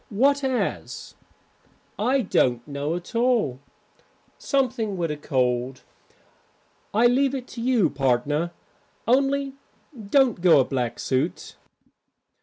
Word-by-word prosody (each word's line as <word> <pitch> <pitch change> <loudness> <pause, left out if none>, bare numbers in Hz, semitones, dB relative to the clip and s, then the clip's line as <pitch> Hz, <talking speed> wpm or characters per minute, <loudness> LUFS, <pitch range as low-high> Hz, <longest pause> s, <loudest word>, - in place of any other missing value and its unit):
"What 275 +7 +2
as?" 260 -2 -3 0.9
"I 255 +6 +2
don't 120 - +1
know 145 +2 -3
at 175 +5 -8
all 230 - +1 0.8
something 230 -7 -1
with 165 -3 -1
a - - -2
cold. 125 -2 -1 1.1
I 225 +4 +3
leave 265 +3 +3
it 255 -2 -5
to 235 - -7
you, 240 -6 +3
partner, 140 +4 0 0.6
only 275 +2 +2 0.4
don't 240 -2 +1
go 170 -5 +6
a 130 - +3
black 125 -4 -2
suit." 135 +6 -2
200 Hz, 110 wpm, -24 LUFS, -, 1.1 s, go